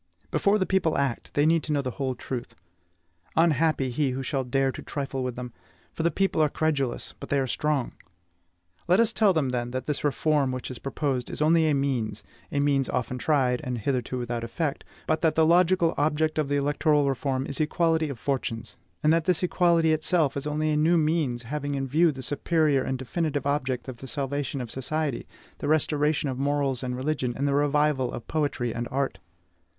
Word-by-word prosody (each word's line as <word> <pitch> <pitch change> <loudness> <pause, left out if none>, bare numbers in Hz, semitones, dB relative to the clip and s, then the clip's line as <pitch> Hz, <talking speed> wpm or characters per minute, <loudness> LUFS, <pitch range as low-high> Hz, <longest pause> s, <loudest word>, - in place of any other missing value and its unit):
Before 200 +1 +3
the 190 - +1
people 185 -5 +1
act, 135 -4 -1
they 145 - +3
need 165 +1 +4
to 155 - -5
know 145 -2 +1
the 130 - -2
whole 130 0 -2
truth. 125 0 -6 0.8
Unhappy 155 -4 +2
he 140 +2 +1
who 130 +1 -3
shall 135 0 -1
dare 135 +1 +1
to - - -8
trifle 135 -2 -4
with 125 -1 -3
them! 125 -1 -7 0.4
For - - -4
the 170 - +3
people 190 0 +1
are 155 - +4
credulous, 145 -5 -1
but - - -8
they 140 - +2
are 135 - +1
strong. 145 0 -1 1.0
Let 180 +4 +4
us 230 0 +3
tell 215 -4 +4
them, 155 -7 +1
then, 120 -1 -2
that 130 0 -4
this 150 -2 -2
reform 145 -1 +1
which 130 0 -5
is 125 - -7
proposed 135 -2 -2
is - - -5
only 160 +1 +4
a 145 - +2
means, 125 -6 -1 0.3
a 145 - 0
means 140 -2 +2
often 125 0 -2
tried, 130 -5 +2
and 125 -1 -3
hitherto 125 +2 -2
without 120 -1 -3
effect, 140 +5 -3 0.2
but 155 0 0
that 160 -2 +2
the 160 - +4
logical 175 0 +4
object 155 +1 +1
of 150 -2 0
the 145 - +1
electoral 145 +1 +2
reform 135 0 -1
is 140 +1 -2
equality 160 0 +1
of 140 - -5
fortunes; 115 -3 -3 0.3
and 155 +1 +5
that 165 -1 +1
this 180 -1 +2
equality 170 -3 +3
itself 155 -2 +1
is 140 +1 -3
only 155 +1 0
a 150 - +1
new 165 +3 +4
means 150 -6 0
having 145 +3 -3
in 135 0 -1
view 160 +5 +4
the 135 -2 -8
superior 150 0 +1
and 130 0 -2
definitive 145 +2 -2
object 135 -3 -1
of 130 -2 -6
the 135 - -9
salvation 140 -1 -2
of 120 - -6
society, 145 0 -2 0.3
the - - -3
restoration 150 -1 +2
of 130 -1 -3
morals 140 -2 0
and 125 -1 -3
religion, 130 -3 -1
and 140 +1 0
the 140 - +1
revival 145 -2 +2
of 115 - -7
poetry 140 -7 -1
and 120 +1 -3
art. 135 -5 -2
145 Hz, 205 wpm, -26 LUFS, 130-155 Hz, 1.0 s, and